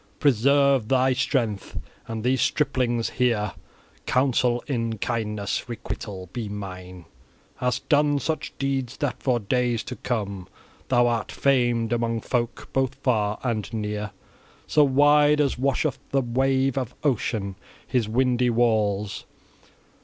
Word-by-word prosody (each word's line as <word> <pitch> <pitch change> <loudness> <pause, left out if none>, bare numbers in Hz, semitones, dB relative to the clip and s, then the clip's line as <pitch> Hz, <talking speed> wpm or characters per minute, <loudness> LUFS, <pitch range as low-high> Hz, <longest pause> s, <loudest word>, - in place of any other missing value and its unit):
Preserve 140 -1 +3
thy 130 +1 +3
strength, 120 -6 -1 0.3
and 115 -1 -4
these 125 0 +2
striplings 120 -5 +1
here 115 -5 +1 0.6
counsel 125 -2 +2
in 115 -4 -2
kindness: 105 0 -2
requital 100 -5 -6
be 115 -4 -4
mine. 90 -3 -8 0.5
Hast 125 0 -2
done 145 0 +3
such 155 +2 -2
deeds, 135 -2 -2
that 145 -4 -2
for 125 -3 +1
days 120 +1 0
to 125 - -6
come 100 -8 -3 0.4
thou 120 -1 +4
art 120 -2 -1
famed 120 -4 +2
among 115 -1 0
folk 120 +1 -2
both 135 -2 0
far 105 -5 0
and 115 -5 -2
near, 105 -1 -3 0.6
so 150 - +4
wide 145 +2 +5
as 140 -4 +1
washeth 140 +1 0
the 135 - +2
wave 135 +2 +1
of 125 -2 -5
Ocean 110 -8 -1 0.3
his 120 -5 0
windy 125 +1 +2
walls. 105 -4 +1
120 Hz, 125 wpm, -25 LUFS, 110-135 Hz, 0.6 s, wide